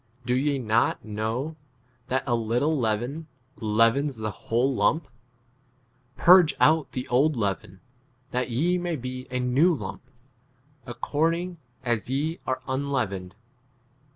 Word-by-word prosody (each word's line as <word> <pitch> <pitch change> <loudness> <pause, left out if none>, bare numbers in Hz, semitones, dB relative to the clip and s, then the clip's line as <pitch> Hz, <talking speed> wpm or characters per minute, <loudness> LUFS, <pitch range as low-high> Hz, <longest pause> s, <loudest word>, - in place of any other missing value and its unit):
Do 125 - +1
ye 140 +2 +1
not 115 -2 +1
know 110 +9 -3 0.5
that 130 0 0
a 120 - 0
little 120 +7 +1
leaven 125 +6 -1 0.3
leavens 115 +6 +2
7 110 - -9
the 110 - -1
whole 120 +6 0
lump? 155 +4 +1 1.1
Purge 180 -2 +6
w 155 - +6
out 150 - -14
the 125 - -4
old 140 +5 +3
leaven, 100 -3 -3 0.5
that 125 0 -1
ye 170 +10 +1
may 175 -1 -2
be 130 -1 -6
a 125 0 -2
new 135 +8 +3
lump, - - -6 0.9
according 165 +7 -1 0.2
as 120 -2 -1
ye 150 +5 -1
are 130 - -2
un 135 +2 -2
leavened. 100 -8 -2
130 Hz, 135 wpm, -26 LUFS, 115-150 Hz, 1.1 s, Purge